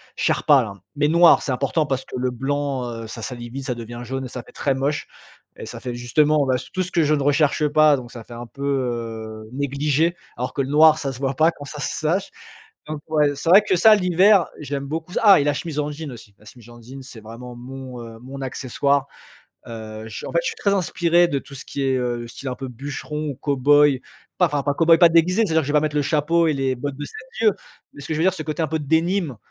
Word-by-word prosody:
Sherpa, 145 Hz, -3 st, +3 dB
là 100 Hz, -3 st, -6 dB, 0.2 s
mais 145 Hz, +1 st, +2 dB
noire. 170 Hz, +2 st, +6 dB
C'est 140 Hz, -, -3 dB
important 140 Hz, +5 st, 0 dB
parce 135 Hz, -2 st, -2 dB
que -, -, -9 dB
le 125 Hz, 0 st, 0 dB
blanc, 135 Hz, 0 st, -2 dB, 0.2 s
heu, -, -, -8 dB
ça 115 Hz, +1 st, -8 dB
salit 120 Hz, 0 st, -6 dB
vite. 135 Hz, +2 st, -7 dB
Ça 125 Hz, -3 st, -2 dB
devient 120 Hz, 0 st, -8 dB
jaune 135 Hz, +2 st, -4 dB
et -, -, -5 dB
ça 125 Hz, -2 st, -7 dB
fait -, -, -17 dB
très 140 Hz, -, 0 dB
moche 140 Hz, +2 st, -2 dB, 0.5 s
et -, -, -8 dB
ça -, -, -8 dB
fait 125 Hz, -1 st, -5 dB
justement, 145 Hz, +5 st, +2 dB
bah, 130 Hz, -1 st, +1 dB, 0.2 s
tout 185 Hz, -, 0 dB
ce 180 Hz, -, -8 dB
que 165 Hz, -, +2 dB
je 150 Hz, +1 st, +2 dB
ne 145 Hz, -2 st, 0 dB
recherche 145 Hz, +1 st, +2 dB
pas 155 Hz, 0 st, +5 dB
donc 120 Hz, -1 st, -9 dB
ça 115 Hz, -2 st, -9 dB
fait 120 Hz, -, -12 dB
un 120 Hz, +1 st, -7 dB
peu, 140 Hz, -, -14 dB
heu, 115 Hz, -5 st, -3 dB
négligé 145 Hz, +4 st, 0 dB, 0.2 s
alors 125 Hz, +1 st, -3 dB
que 140 Hz, -, -1 dB
le 130 Hz, -, -2 dB
noir, 155 Hz, +1 st, +6 dB
ça 135 Hz, -3 st, -3 dB
se 125 Hz, -, -10 dB
voit 135 Hz, 0 st, -1 dB
pas 160 Hz, +3 st, +4 dB
quand 145 Hz, -, -12 dB
ça 150 Hz, +1 st, -8 dB
se -, -, -1 dB
s -, -, -4 dB
tâche. 180 Hz, +6 st, 0 dB, 0.6 s
Donc 155 Hz, -1 st, -5 dB
ouais, 150 Hz, -2 st, +2 dB
c'est 165 Hz, +4 st, -3 dB
vrai 195 Hz, +4 st, +8 dB
que 185 Hz, -, +3 dB
ça 215 Hz, +5 st, +7 dB
l'hiver, 185 Hz, +1 st, +4 dB
j'aime 140 Hz, -1 st, -4 dB
beaucoup 160 Hz, +4 st, -5 dB
ah 200 Hz, -6 st, +7 dB
et -, -, +2 dB
la 145 Hz, 0 st, +1 dB
chemise 150 Hz, +1 st, -4 dB
en 150 Hz, 0 st, -1 dB
jean 150 Hz, -1 st, -7 dB
aussi! 110 Hz, -4 st, -13 dB
La 105 Hz, -, -21 dB
chemise 120 Hz, +1 st, -15 dB
en 120 Hz, 0 st, -13 dB
jean, 135 Hz, +4 st, -10 dB
c'est 120 Hz, -4 st, -12 dB
vraiment 120 Hz, +3 st, -10 dB
mon, 130 Hz, 0 st, -9 dB
heu, 115 Hz, -1 st, -10 dB
mon 135 Hz, +2 st, -9 dB
accessoire. 140 Hz, +2 st, -1 dB, 0.6 s
Heu, 110 Hz, -1 st, -8 dB
je 105 Hz, -, -7 dB
en -, -, -6 dB
fait, -, -, +3 dB
je -, -, -1 dB
suis -, -, -3 dB
très 200 Hz, -1 st, 0 dB
inspiré 175 Hz, -2 st, +2 dB
de 140 Hz, -, -1 dB
tout 140 Hz, -, -13 dB
ce -, -, -9 dB
qui 140 Hz, -, -4 dB
est, 135 Hz, -1 st, +1 dB
heu, 120 Hz, -1 st, -3 dB
style 130 Hz, +3 st, -7 dB
un 125 Hz, -, -4 dB
peu 135 Hz, 0 st, -6 dB
bûcheron 145 Hz, +4 st, -5 dB
ou -, -, -8 dB
cowboy, 145 Hz, 0 st, +3 dB, 0.4 s
pas 180 Hz, -, +4 dB
enfin 145 Hz, -2 st, -2 dB
pas 145 Hz, -, 0 dB
cowboy, 165 Hz, +2 st, +5 dB
pas 170 Hz, -2 st, +7 dB
déguisé, 180 Hz, +6 st, +3 dB
c'est-à-dire 160 Hz, -3 st, +2 dB
que -, -, -6 dB
je -, -, -1 dB
vais 150 Hz, -, +5 dB
mettre 150 Hz, -1 st, -2 dB
le 145 Hz, -, +2 dB
chapeau 165 Hz, +3 st, +2 dB
et 155 Hz, -, +2 dB
les 135 Hz, -1 st, -1 dB
bottes 140 Hz, +2 st, -5 dB
de 145 Hz, -, -5 dB
7 -, -, -10 dB, 0.2 s
lieues 215 Hz, -3 st, +4 dB, 0.4 s
mais 145 Hz, -, -11 dB
ce 140 Hz, -, -7 dB
je -, -, -2 dB
veux 160 Hz, -, +1 dB
dire, 190 Hz, 0 st, +3 dB
ce 155 Hz, -, -6 dB
côté 155 Hz, +2 st, -3 dB
un -, -, 0 dB
peu 160 Hz, +1 st, -2 dB
denim, 160 Hz, -, 0 dB
140 Hz, 260 wpm, -22 LUFS, 125-155 Hz, 0.6 s, vrai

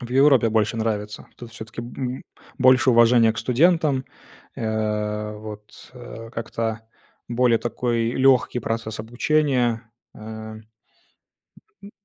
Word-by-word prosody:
В 120 Hz, -, -8 dB
Европе 135 Hz, -2 st, +5 dB
больше 110 Hz, 0 st, +1 dB
нравится. 105 Hz, -2 st, -3 dB
Тут 120 Hz, -1 st, -11 dB
всё-таки 110 Hz, 0 st, -8 dB
б 125 Hz, +2 st, -5 dB, 0.4 s
больше 130 Hz, 0 st, +5 dB
уважения 115 Hz, -1 st, +5 dB
к 110 Hz, -, -8 dB
студентам, 145 Hz, +2 st, +2 dB, 0.5 s
э, 105 Hz, -1 st, -2 dB
вот, 105 Hz, 0 st, -11 dB
э, 115 Hz, -2 st, -10 dB
как-то 115 Hz, -1 st, -3 dB, 0.5 s
более 120 Hz, -1 st, +2 dB
такой 120 Hz, -1 st, -1 dB
лёгкий 130 Hz, -2 st, +3 dB
процесс 115 Hz, -1 st, -4 dB
обучения, 120 Hz, -1 st, 0 dB, 0.2 s
э, -, -, -14 dB
м, 110 Hz, 0 st, -9 dB, 1.2 s
м 200 Hz, -, -11 dB
115 Hz, 115 wpm, -23 LUFS, 110-125 Hz, 1.2 s, Европе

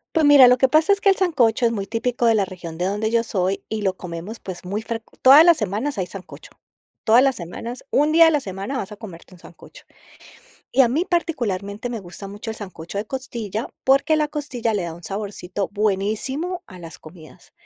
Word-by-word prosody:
Pues 310 Hz, -2 st, +4 dB
mira, 280 Hz, -3 st, +9 dB
lo 250 Hz, 0 st, +4 dB
que 265 Hz, -, +5 dB
pasa 315 Hz, +6 st, +4 dB
es 400 Hz, -, -3 dB
que 400 Hz, -, +4 dB
el 385 Hz, -, +4 dB
sancocho 255 Hz, -, +2 dB
es 230 Hz, -, +3 dB
muy 200 Hz, -3 st, -4 dB
típico 240 Hz, +1 st, -1 dB
de 225 Hz, -, +4 dB
la 200 Hz, -, +2 dB
región 175 Hz, -3 st, -9 dB
de 180 Hz, -, -1 dB
donde 210 Hz, +3 st, -1 dB
yo 230 Hz, 0 st, +2 dB
soy, 195 Hz, -3 st, -2 dB
y 220 Hz, -1 st, -4 dB
lo 190 Hz, -2 st, -1 dB
comemos, 180 Hz, +5 st, -7 dB
pues, 185 Hz, -2 st, -8 dB
muy 205 Hz, +4 st, -4 dB
frec 225 Hz, 0 st, -4 dB, 0.2 s
todas 275 Hz, +4 st, +9 dB
las 340 Hz, -2 st, +6 dB
semanas 215 Hz, +6 st, -2 dB
hay 185 Hz, -, -1 dB
sancocho. 185 Hz, 0 st, -11 dB, 0.5 s
Todas 235 Hz, +4 st, +5 dB
las 270 Hz, -2 st, +2 dB
semanas, 230 Hz, +7 st, -7 dB
un 295 Hz, +2 st, +2 dB
día 330 Hz, +1 st, +7 dB
a -, -, +6 dB
la 300 Hz, -, +2 dB
semana 200 Hz, +3 st, -5 dB
vas 205 Hz, -5 st, -5 dB
a -, -, -7 dB
comerte 190 Hz, -4 st, -12 dB
un 180 Hz, -, -16 dB
sancocho. -, -, -16 dB, 0.9 s
Y 270 Hz, -, +3 dB
a 245 Hz, -, +6 dB
mí, 310 Hz, +9 st, 0 dB
particularmente, 230 Hz, -, -2 dB
me 230 Hz, -, -4 dB
gusta 190 Hz, +2 st, -9 dB
mucho 205 Hz, +3 st, -7 dB
el 220 Hz, -, -6 dB
sancocho 185 Hz, -2 st, -8 dB
de 205 Hz, -, -2 dB
costilla, 235 Hz, -4 st, -5 dB, 0.2 s
porque 275 Hz, +4 st, +3 dB
la 305 Hz, -1 st, +1 dB
costilla 260 Hz, -7 st, -3 dB
le 200 Hz, -, -1 dB
da 170 Hz, -1 st, -5 dB
un 175 Hz, 0 st, -14 dB
saborcito 195 Hz, -1 st, -4 dB
buenísimo 220 Hz, -, -2 dB
a 185 Hz, -2 st, -13 dB
las 165 Hz, -1 st, -10 dB
comidas, 155 Hz, 0 st, -15 dB
220 Hz, 220 wpm, -22 LUFS, 195-265 Hz, 0.9 s, mira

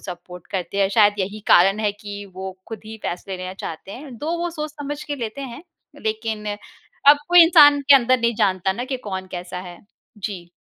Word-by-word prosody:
Support 180 Hz, -1 st, -10 dB
करते 190 Hz, +1 st, -3 dB
हैं। 195 Hz, -, +3 dB
शायद 205 Hz, 0 st, +4 dB
यही 200 Hz, +3 st, -3 dB
कारण 195 Hz, +4 st, +5 dB
है 210 Hz, -2 st, 0 dB
कि 205 Hz, 0 st, -8 dB
वो 190 Hz, 0 st, -7 dB
खुद 220 Hz, -3 st, -7 dB
ही 220 Hz, +1 st, -8 dB
फ़ैसले 185 Hz, +2 st, -4 dB
लेना 185 Hz, +1 st, -6 dB
चाहते 165 Hz, 0 st, -8 dB
हैं, 265 Hz, -2 st, -10 dB
तो 315 Hz, +3 st, -3 dB
वो 345 Hz, 0 st, -2 dB
सोच-समझ 300 Hz, -2 st, -6 dB
के 290 Hz, -, -4 dB
लेते 235 Hz, +1 st, -5 dB
हैं। 265 Hz, +2 st, -8 dB, 0.4 s
लेकिन 220 Hz, -1 st, -3 dB, 0.6 s
अब 290 Hz, -, +10 dB
कोई 350 Hz, -1 st, +9 dB
इंसान 295 Hz, -4 st, +7 dB
के 285 Hz, -, +10 dB
अंदर 255 Hz, -1 st, +4 dB
नहीं 235 Hz, 0 st, +1 dB
जानता 190 Hz, -1 st, +1 dB
ना 240 Hz, +6 st, -4 dB
कि 260 Hz, 0 st, -3 dB
कौन 190 Hz, 0 st, -4 dB
कैसा 180 Hz, 0 st, -6 dB
है? 175 Hz, -1 st, -10 dB, 0.4 s
जी। 185 Hz, -4 st, -6 dB
210 Hz, 195 wpm, -22 LUFS, 190-275 Hz, 0.6 s, अब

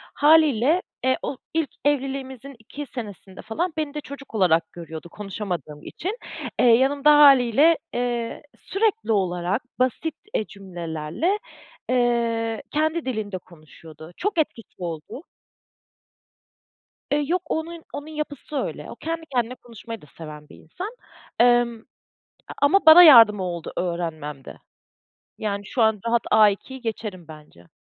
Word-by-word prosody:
Hâliyle, 305 Hz, +1 st, +4 dB, 0.2 s
eee, 260 Hz, 0 st, +2 dB
o, 270 Hz, -, -4 dB, 0.2 s
ilk 320 Hz, -3 st, 0 dB, 0.2 s
evliliğimizin 270 Hz, -2 st, -2 dB
2 285 Hz, +6 st, -8 dB
senesinde 205 Hz, -6 st, -9 dB
falan 320 Hz, +10 st, -3 dB
beni 305 Hz, -2 st, -2 dB
de 300 Hz, -, -4 dB
çocuk 275 Hz, -4 st, -11 dB
olarak 165 Hz, -4 st, +2 dB
görüyordu 165 Hz, -1 st, -9 dB
konuşamadığım 180 Hz, -, -6 dB
için. 400 Hz, +8 st, -5 dB, 0.4 s
Eee, -, -, +4 dB
yanımda 270 Hz, +5 st, +5 dB
hâliyle, 280 Hz, +3 st, +6 dB, 0.2 s
eee, 240 Hz, -1 st, -2 dB, 0.2 s
sürekli 430 Hz, -, -1 dB
olarak, 185 Hz, +2 st, 0 dB, 0.2 s
basit, 280 Hz, +5 st, 0 dB, 0.2 s
eee, 215 Hz, -, 0 dB
cümlelerle, 175 Hz, -, -3 dB, 0.5 s
eee, 235 Hz, -2 st, 0 dB
kendi 315 Hz, +1 st, 0 dB
dilinde 215 Hz, -6 st, -3 dB
konuşuyordu. 160 Hz, -1 st, -14 dB
Çok 405 Hz, -2 st, -2 dB
etkisi 235 Hz, -7 st, -3 dB
oldu. 170 Hz, -, -6 dB, 1.9 s
Eee, 295 Hz, +1 st, +2 dB
yok 360 Hz, +1 st, +1 dB
onun 325 Hz, +1 st, -4 dB
onun 290 Hz, +2 st, -6 dB
yapısı 300 Hz, -1 st, -6 dB
öyle. -, -, -4 dB
O, -, -, -8 dB
kendi 325 Hz, 0 st, -5 dB
kendine 245 Hz, +1 st, 0 dB
konuşmayı 230 Hz, -1 st, -10 dB
da -, -, -15 dB
seven 150 Hz, -2 st, -10 dB
bir -, -, -13 dB
insan. 360 Hz, -, -8 dB, 0.5 s
Emm, 240 Hz, -1 st, +4 dB, 0.7 s
a -, -, -7 dB
ama 320 Hz, +7 st, +4 dB
bana 320 Hz, +3 st, +11 dB
yardımı 225 Hz, -, +8 dB
oldu 170 Hz, -3 st, -5 dB
öğrenmemde. 160 Hz, -6 st, -4 dB, 0.8 s
Yani, 200 Hz, -2 st, -3 dB
şu 250 Hz, -5 st, 0 dB
an 220 Hz, -2 st, +3 dB
rahat 235 Hz, 0 st, +2 dB
A2'yi 215 Hz, +5 st, +3 dB
geçerim 210 Hz, -7 st, -5 dB
bence. 150 Hz, -, -14 dB
235 Hz, 125 wpm, -23 LUFS, 185-290 Hz, 1.9 s, bana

